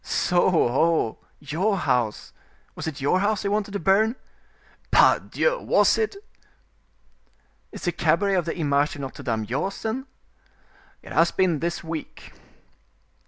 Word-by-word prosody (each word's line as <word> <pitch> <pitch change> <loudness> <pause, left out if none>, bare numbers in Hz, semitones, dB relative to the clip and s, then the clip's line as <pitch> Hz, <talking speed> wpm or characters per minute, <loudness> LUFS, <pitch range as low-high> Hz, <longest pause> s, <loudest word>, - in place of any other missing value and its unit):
"So, 175 +1 +1
ho, 160 -4 +1 0.2
your 175 +8 -1
house—was 120 - -4
it 150 -3 -5
your 145 +7 +2
house 205 +1 0
they 200 - -1
wanted 205 0 -1
to 200 - -2
burn?" 210 +7 +2 0.7
"Pardieu! - - +3
was - - +3
it!" 435 -2 -1 1.6
"Is - - -10
the 175 - +1
cabaret 175 +4 +1
of 180 -3 +1
the 165 - -4
Image 145 -2 +1
de - - -9
Notre 135 -2 -7
Dame 110 -2 -2
yours, 140 - -3
then?" 255 +5 -3 1.0
"It - - -12
has 170 +1 +3
been 175 -5 +1
this 170 +2 -3
week." 160 -1 -7
170 Hz, 135 wpm, -24 LUFS, 145-200 Hz, 1.6 s, Pardieu